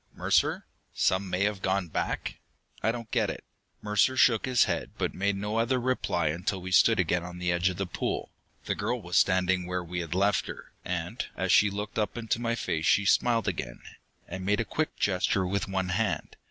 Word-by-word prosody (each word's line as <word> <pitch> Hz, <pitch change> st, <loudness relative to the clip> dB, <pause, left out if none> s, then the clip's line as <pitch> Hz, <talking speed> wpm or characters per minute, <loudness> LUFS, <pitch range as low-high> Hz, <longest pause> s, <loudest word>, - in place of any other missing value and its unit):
Mercer? -, -, +1 dB, 0.3 s
'Some 95 Hz, +1 st, +1 dB
may 90 Hz, +2 st, 0 dB
have 105 Hz, -2 st, -1 dB
gone 95 Hz, -1 st, 0 dB
back?' 80 Hz, -, -3 dB, 0.4 s
I 110 Hz, -, +2 dB
don't 115 Hz, -2 st, -7 dB
get -, -, +1 dB
it." -, -, -6 dB, 0.4 s
Mercer 105 Hz, +5 st, +2 dB
shook 115 Hz, -1 st, +4 dB
his 125 Hz, -2 st, +4 dB
head, -, -, -2 dB
but -, -, -1 dB
made 100 Hz, +1 st, 0 dB
no 105 Hz, +3 st, -2 dB
other 125 Hz, +3 st, +2 dB
reply 120 Hz, -10 st, 0 dB
until 90 Hz, +5 st, -2 dB
we 95 Hz, +1 st, -7 dB
stood 100 Hz, +5 st, +5 dB
again 90 Hz, 0 st, +1 dB
on 90 Hz, 0 st, -8 dB
the 90 Hz, 0 st, 0 dB
edge 85 Hz, +2 st, +2 dB
of 90 Hz, -, -5 dB
the 95 Hz, -, -1 dB
pool. -, -, -3 dB, 0.3 s
The -, -, 0 dB
girl 115 Hz, +4 st, -2 dB
was 90 Hz, -4 st, -5 dB
standing 95 Hz, -1 st, +2 dB
where 90 Hz, 0 st, -2 dB
we 90 Hz, +1 st, -4 dB
had 85 Hz, 0 st, -4 dB
left 100 Hz, +2 st, +2 dB
her, -, -, -9 dB
and -, -, -3 dB
as -, -, 0 dB
she 105 Hz, -, +6 dB
looked 105 Hz, +2 st, -4 dB
up 105 Hz, +2 st, -1 dB
into 115 Hz, 0 st, -1 dB
my 115 Hz, 0 st, 0 dB
face, 80 Hz, -8 st, -2 dB
she 100 Hz, -, +4 dB
smiled 115 Hz, +2 st, +3 dB
again, 65 Hz, -10 st, -4 dB, 0.4 s
and 95 Hz, +1 st, -6 dB
made 105 Hz, +2 st, +1 dB
a 115 Hz, -, 0 dB
quick 155 Hz, +10 st, -2 dB
gesture 95 Hz, 0 st, +1 dB
with 100 Hz, +2 st, -1 dB
one 95 Hz, -1 st, -2 dB
hand. 100 Hz, +2 st, -1 dB
95 Hz, 205 wpm, -28 LUFS, 90-110 Hz, 0.4 s, she